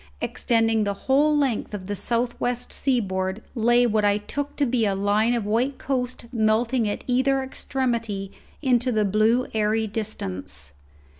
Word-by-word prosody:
Extending 225 -2 +1
the 200 -1 -1
whole 295 +3 +4
length 260 -7 0
of 190 -2 -7
the 205 +2 -3
south 235 +4 0
west 245 0 -1
seaboard 195 -6 -1
lay 240 0 +3
what 215 -2 +1
I 205 0 +3
took 285 +7 -5
to 285 - +1
be 240 -2 +1
a 200 -2 +1
line 210 +4 +2
of 230 -4 -2
white 240 +6 0
coast 250 -2 -3
melting 225 0 +1
at 205 - -4
either 265 +2 +2
extremity 235 -7 -2 0.3
into 250 -1 +2
the 215 -2 +2
blue 215 +5 +2
airy 220 0 +1
distance. 95 - -5
225 Hz, 155 wpm, -24 LUFS, 210-250 Hz, 0.3 s, whole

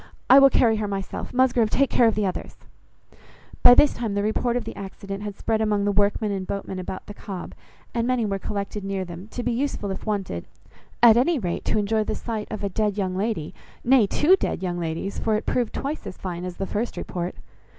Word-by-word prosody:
"I 265 - +10
will 275 0 +8
carry 230 -4 +3
her 210 -1 -2
myself. 195 -1 -4
Musgrove, 245 -3 +3
take 275 +4 +2
care 240 - +5
of 225 - +2
the 210 -1 +1
others." 185 - -4 1.1
By 245 - +9
this 295 - +5
time 225 -4 -3
the 205 - 0
report 235 +3 0
of 245 - -2
the - - -7
accident 195 0 -7
had 205 -1 -6
spread 220 -1 0
among 210 -2 +1
the 205 - +2
workmen 205 +1 +1
and 190 -2 -3
boatmen 195 -1 -4
about 185 +1 -6
the 205 - -8
Cobb, 195 -3 -7 0.4
and 235 -1 0
many 250 -3 +1
were 195 -1 -2
collected 200 +1 -4
near 195 -1 -2
them, 175 +3 -9
to 245 +3 -5
be 245 - 0
useful 235 -5 -2
if 190 - -5
wanted, 195 - -2 0.6
at 230 -1 +8
any 295 +7 +3
rate, 180 -8 -3
to - - +1
enjoy 215 +1 +1
the 215 - -3
sight 220 -3 -4
of 215 -2 -5
a - - +1
dead 210 +1 -1
young 185 -2 -1
lady, 195 -6 -2 0.3
nay, 245 -4 +5
two 315 - +4
dead 370 - -3
young 175 -1 -2
ladies, 165 +4 -3
for 220 - +1
it 215 - -2
proved 245 -3 0
twice 290 +3 -4
as - - -7
fine 180 -1 -5
as 180 -1 -6
the 195 - -2
first 215 +5 -3
report. 175 0 -4
210 Hz, 225 wpm, -24 LUFS, 195-235 Hz, 1.1 s, I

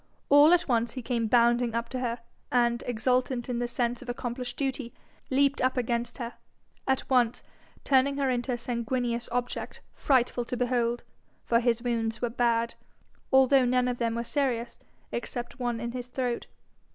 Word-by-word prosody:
All 290 +3 +8
at 355 0 +4
once 235 -3 +1
he 255 - -6
came 230 -2 0
bounding 235 0 +3
up 235 0 -1
to 255 - -3
her, 240 -1 -2 0.3
and, 240 -1 +2
exultant 250 +1 0
in 240 -1 -1
the 240 - -1
sense 240 0 -1
of 255 - -9
accomplished 245 0 -4
duty, 265 -3 -3 0.3
leaped 275 +1 +2
up 255 +1 +1
against 240 -1 -1
her, 235 -2 -5 0.5
at 265 -1 0
once 245 -3 +2 0.4
turning 275 +1 +3
her 275 -1 +1
into 250 0 0
a 245 - 0
sanguineous 235 0 -2
object 245 0 -3
frightful 250 -2 +2
to 250 - -4
behold; 240 -1 0 0.4
for 230 - +3
his 235 -1 +1
wounds 225 -2 -1
were 240 -2 -1
bad, 235 -1 +1 0.6
although 265 0 +6
none 250 0 +2
of 245 -1 -2
them 230 -1 0
were 235 - -1
serious 240 -3 -1 0.3
except 240 +2 -5
one 240 -2 -1
in 235 +1 -3
his 245 0 -6
throat. 245 -1 -2
245 Hz, 170 wpm, -28 LUFS, 235-255 Hz, 0.6 s, All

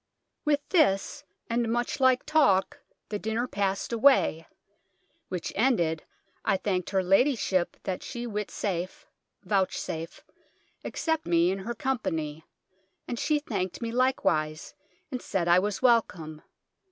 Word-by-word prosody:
With 290 -1 +1
this 245 - +2 0.2
and 235 -1 0
moche 240 +4 -1
like 260 -1 +4
talke 290 -12 +3 0.3
the 210 - -3
dyner 220 +3 -1
passyd 200 0 -1
away: 230 - +4 0.8
which 180 -2 -4
ended, 175 -9 +1 0.4
I 195 - +2
thanked 185 -2 -1
her 190 -1 +1
ladyship 195 -2 +2
that 185 -1 -3
she 240 -2 -6
would 210 -3 -3
witsafe 185 -2 -4 0.4
(vouchsafe) 185 -4 -2 0.6
accept 320 -1 -2
me 170 +1 +3
in 195 - -3
hir 235 +1 -3
com 265 -2 -1
payne; 155 -5 -3 0.7
and 240 - -3
she 305 0 +2
thanked 200 - -3
me 230 - -2
likewise, 160 -12 0 0.4
and 250 -2 -3
sayd 175 -3 -1
I 175 +1 +6
was 205 +4 -2
wellcome. 175 -11 +2
205 Hz, 130 wpm, -28 LUFS, 180-250 Hz, 0.8 s, I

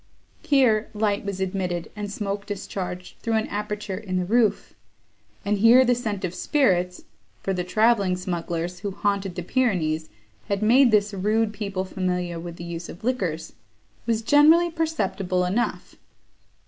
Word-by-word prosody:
Here, 245 -7 +3
light 210 -1 0
was 200 -2 -4
admitted, 180 -3 -2
and 205 -1 -5
smoke 200 0 -4
discharged, 185 -3 -6
through 230 -1 -1
an 220 - +1
aperture 210 -2 -4
in 185 -4 -3
the 180 - 0
roof; 225 +2 +1 0.7
and 205 0 +1
here 240 +4 +7
the 245 - +4
scent 215 -5 -3
of 175 - -4
spirits 180 - +1 0.4
(for 195 - 0
the 180 -1 -1
travelling 200 0 +2
smugglers, 175 -1 -3
who 200 +2 -3
haunted 200 -1 -1
the 180 - -4
Pyrenees, 170 -9 0 0.4
had 200 +1 -1
made 250 +4 +6
this 210 -1 +2
rude 210 +3 +1
people 195 -3 -3
familiar 180 -2 -2
with 170 0 -7
the 170 - -9
use 170 0 -6
of 175 - -11
liquors) 190 -10 -2 0.5
was 230 -1 0
generally 315 +7 +5
perceptible 195 - -1
enough. 210 +7 -2
200 Hz, 150 wpm, -24 LUFS, 180-220 Hz, 0.7 s, here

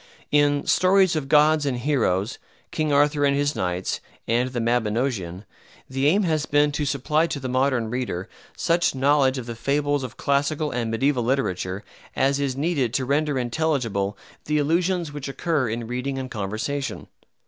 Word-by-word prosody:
In 145 -1 +3
"Stories 185 -1 +4
of 140 -3 -3
Gods 150 +1 +5
and 135 -3 -1
Heroes," 120 -6 0 0.3
"King 155 -1 -1
Arthur 145 +1 +3
and 140 -1 +3
His 145 +1 0
Knights" 90 0 -2 0.3
and 120 +3 +1
"The 125 -1 -3
Mabinogeon" 115 -5 -1 0.4
the 135 +2 0
aim 200 +7 +3
has 155 -4 0
been 145 0 +3
to 150 0 -2
supply 150 +4 +1
to 150 - -4
the 130 - -4
modern 130 -3 +1
reader 120 -8 -3 0.3
such 170 -3 +1
knowledge 135 0 +3
of 125 - -5
the 120 - -5
fables 145 +4 0
of 130 -2 -7
classical 145 +2 0
and 120 -3 -2
mediaeval 130 +3 +1
literature 100 -6 -1 0.3
as 135 +1 +2
is 135 -2 -1
needed 140 -6 0
to 130 - 0
render 145 +1 +1
intelligible 120 -7 -1 0.3
the 150 0 0
allusions 165 +2 0
which 145 -1 -5
occur 135 -1 -1
in 115 +1 -3
reading 125 +3 -3
and 130 -1 -5
conversation. 110 +7 -3
140 Hz, 165 wpm, -24 LUFS, 120-150 Hz, 0.4 s, Gods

